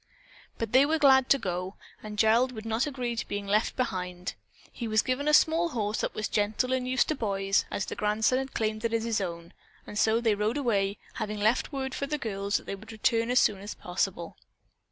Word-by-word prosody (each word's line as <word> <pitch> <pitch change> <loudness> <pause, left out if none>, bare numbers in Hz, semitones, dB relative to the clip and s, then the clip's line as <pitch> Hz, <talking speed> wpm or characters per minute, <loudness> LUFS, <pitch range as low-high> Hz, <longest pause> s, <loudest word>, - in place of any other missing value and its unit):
But 225 -2 -3
they 260 +2 +6
were 310 +3 +2
glad 265 -3 +5
to 275 - +6
go, 185 -3 -4 0.3
and 210 -1 -8
Gerald 230 +4 +3
would 220 -1 -8
not 225 +5 0
agree 250 -4 -3
to 230 - -4
being 205 0 -4
left 210 +3 +1
behind. 180 -7 -3 0.4
He 235 - -5
was 215 0 +2
given 260 +3 -1
a - - +4
small 325 +3 +4
horse 215 -6 -2
that - - -3
was 215 - -2
gentle 215 +5 0
and 255 -1 -1
used 255 -1 +2
to - - +2
boys, 195 -6 0
as 195 - -2
the - - -5
grandson 215 +4 +1
had 265 0 -6
claimed 215 0 -1
it 230 0 0
as 225 - 0
his 230 -2 0
own, 170 -2 -6 0.3
and 210 - -5
so 220 +1 +3
they 230 -2 +2
rode 210 +5 0
away, 200 -7 0 0.2
having 215 -2 -4
left 220 +4 +1
word 265 -2 -3
for 280 - -3
the 300 +1 -1
girls 200 -5 -1
that - - -10
they - - -4
would 215 +3 -10
return 230 +1 +1
as 250 - +4
soon 200 -2 +2
as 205 +1 -7
possible. 180 -1 -3
220 Hz, 225 wpm, -28 LUFS, 205-255 Hz, 0.4 s, they